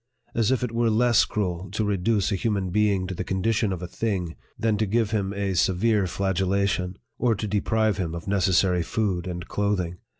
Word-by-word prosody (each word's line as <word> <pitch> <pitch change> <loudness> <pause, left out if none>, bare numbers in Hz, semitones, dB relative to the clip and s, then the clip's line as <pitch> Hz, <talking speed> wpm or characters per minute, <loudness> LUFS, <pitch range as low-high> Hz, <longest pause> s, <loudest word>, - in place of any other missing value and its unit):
As 115 -1 +1
if 130 -1 +1
it 125 - -2
were 115 0 +1
less 115 0 +4
cruel 95 -3 -3
to 110 +1 0
reduce 100 0 +1
a - - +1
hu 105 +5 -1
man 100 -3 -1
being 100 -2 +2
to 95 - -4
the - - -4
condition 105 +2 0
of 90 -1 -4
a - - -4
thing, 90 -4 -2 0.2
than 110 -1 +1
to 110 - +1
give 110 +1 +1
him 100 -3 0
a 100 -1 -2
severe 95 +3 +2
flagellation, 95 0 0 0.2
or 120 -3 +2
to 105 - -4
deprive 105 +1 +1
him 85 -4 -2
of 85 +4 -7
necessary 95 -2 +2
food 95 -1 -1
and 85 -1 -5
clothing 95 -4 -1
100 Hz, 200 wpm, -25 LUFS, 90-110 Hz, 0.2 s, less